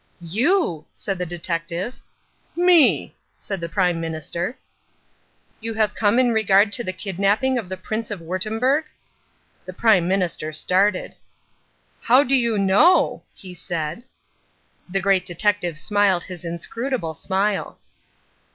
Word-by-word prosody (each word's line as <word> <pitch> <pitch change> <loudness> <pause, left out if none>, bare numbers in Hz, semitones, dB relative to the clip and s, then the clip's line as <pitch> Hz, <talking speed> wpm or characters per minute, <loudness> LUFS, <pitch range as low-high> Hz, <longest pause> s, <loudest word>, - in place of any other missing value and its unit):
"You!" 245 - +1
said 195 -3 -4
the 180 - -3
detective. 170 +4 -3 0.6
"Me," 350 -3 +4 0.2
said 195 -3 -6
the 170 - -4
Prime 180 -3 0
Minister. 165 - -4 1.0
"You 225 0 -5
have 215 -2 +1
come 210 +1 +2
in 250 -2 +3
regard 205 -2 +3
the 235 -5 0
kidnapping 200 +7 0
of 195 -6 -8
the 190 - -4
Prince 215 +4 -4
of 205 -3 -5
Wurttemberg?" 220 - 0 0.8
The 185 - -7
Prime 185 -4 +3
Minister 180 -5 -1
started. 185 +4 +1 0.9
"How 255 +4 +5
do 270 0 +2
you 235 -4 +2
know?" 200 - +4
he 185 -2 -11
said. 170 0 -4 0.9
The 195 +1 0
Great 190 -1 +2
Detective 180 -2 -1
smiled 200 0 +1
his 180 -3 -9
inscrutable 170 +3 -4
smile. 195 +5 -2
195 Hz, 125 wpm, -22 LUFS, 175-225 Hz, 1.0 s, How